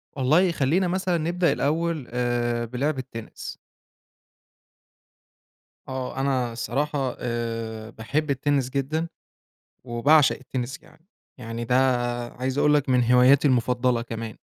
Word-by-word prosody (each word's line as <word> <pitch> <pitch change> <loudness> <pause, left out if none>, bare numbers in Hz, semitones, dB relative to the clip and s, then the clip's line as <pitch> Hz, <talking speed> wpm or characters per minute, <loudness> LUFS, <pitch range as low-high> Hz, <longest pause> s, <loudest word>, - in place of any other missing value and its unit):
والله 155 +7 +3
خلينا 170 +5 +1
مثلًا 180 -1 0
نبدأ 170 +2 +1
الأول 160 -1 -1
آآ، 120 -1 0
بلِعب 135 +5 -2
التِنِس. 115 -3 -8 2.3
آه، 130 -1 -5
أنا 130 -3 0
الصراحة 135 +3 -2
آآ، 115 -2 -4
باحب 140 +8 -2
التِنِس 135 -1 0
جدًا، 140 +5 -1 0.8
وباعشق 135 +5 +4
التِنِس 130 +1 -4
كمان، - - -21 0.4
يعني 115 -1 -5
ده 125 - +1 0.6
عايز 130 +2 -3
أقول 150 +1 +4
لك 145 -2 +2
من 125 -2 +3
هواياتي 130 +3 +6
المفضَّلة 125 -1 +1
كمان. 115 -1 -6
130 Hz, 110 wpm, -25 LUFS, 120-150 Hz, 2.3 s, هواياتي